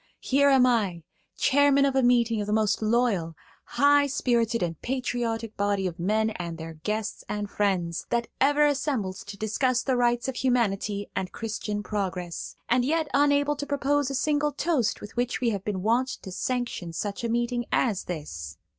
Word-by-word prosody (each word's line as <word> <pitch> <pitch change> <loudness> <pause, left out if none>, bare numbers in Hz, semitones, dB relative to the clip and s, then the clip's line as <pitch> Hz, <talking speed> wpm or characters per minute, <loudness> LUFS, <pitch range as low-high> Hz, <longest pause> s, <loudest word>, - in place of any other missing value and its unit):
Here 280 +1 +4
am 265 -2 +6
I, 205 -9 +1 0.3
chairman 280 0 +4
of 275 -1 0
a 265 - +4
meeting 235 -3 +3
of 205 - -4
the 210 - 0
most 215 -1 +1
loyal, 215 -7 +1 0.3
high 285 0 +4
spirited 235 -5 +1
and 165 -3 -4
patriotic 240 -3 -2
body 200 -1 0
of 175 -1 -4
men 215 +5 +1
and 170 -5 -5
their 165 0 -7
guests 210 +7 -3
and 210 0 -2
friends, 185 -5 -1
that 235 0 +1
ever 290 +2 +4
assembled 270 -10 0
to 200 0 -9
discuss 240 +4 0
the 265 - +1
rights 240 0 +1
of 265 - -3
humanity 205 -5 0
and 185 - -2
Christian 210 -2 -4
progress, 185 -5 -4
and 245 +1 +3
yet 310 +3 0
unable 285 +1 +3
to 285 0 -5
propose 285 0 +1
a 275 - -3
single 295 +2 +1
toast 290 -10 0
with 210 - -10
which 245 0 -1
we 240 -2 +1
have 200 -3 -3
been 195 -3 -3
wont 235 +4 +2 0.2
to 190 - -7
sanction 235 -5 -3
such 205 +8 -4
a 235 - -1
meeting 240 +1 0
as 215 -7 +1
this. 115 - -6
230 Hz, 180 wpm, -26 LUFS, 200-265 Hz, 0.3 s, am